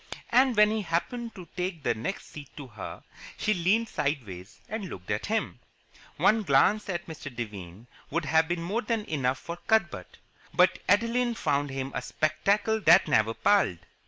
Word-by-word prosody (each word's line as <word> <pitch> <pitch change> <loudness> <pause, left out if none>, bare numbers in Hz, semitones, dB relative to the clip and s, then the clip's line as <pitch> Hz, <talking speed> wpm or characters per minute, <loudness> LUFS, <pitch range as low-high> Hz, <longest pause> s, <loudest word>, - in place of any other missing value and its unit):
And 255 -1 +4
when 210 0 +6
he 220 0 -1
happened 225 +7 -3
to 180 -3 -10
take 180 -4 -3
the - - +2
next 115 - -5
seat 145 -2 -10
to 145 - -7
her, 110 -5 -9 0.3
she 215 - +1
leaned 205 +6 +2
sideways 115 - -4
and 210 -4 -5
looked 90 +2 -7
at 105 - -2
him. 220 +1 -2 0.6
One 220 +1 +4
glance 200 +6 +3
at 175 -2 -3
Mr. 155 -2 -8
Devine 105 -4 -7 0.2
would 165 +1 -1
have 160 +2 +3
been 170 0 -2
more 205 +7 -1
than 220 -1 -2
enough 135 -4 -1
for 170 +3 -7
Cuthbert; 220 -6 0 0.4
but - - +4
Adeline 235 +3 +2
found 145 -6 0
him 135 0 -4
a - - -2
spectacle 200 - 0
that 170 -2 +6
never 110 +1 +2
palled. 200 - +3
170 Hz, 170 wpm, -28 LUFS, 135-210 Hz, 0.6 s, when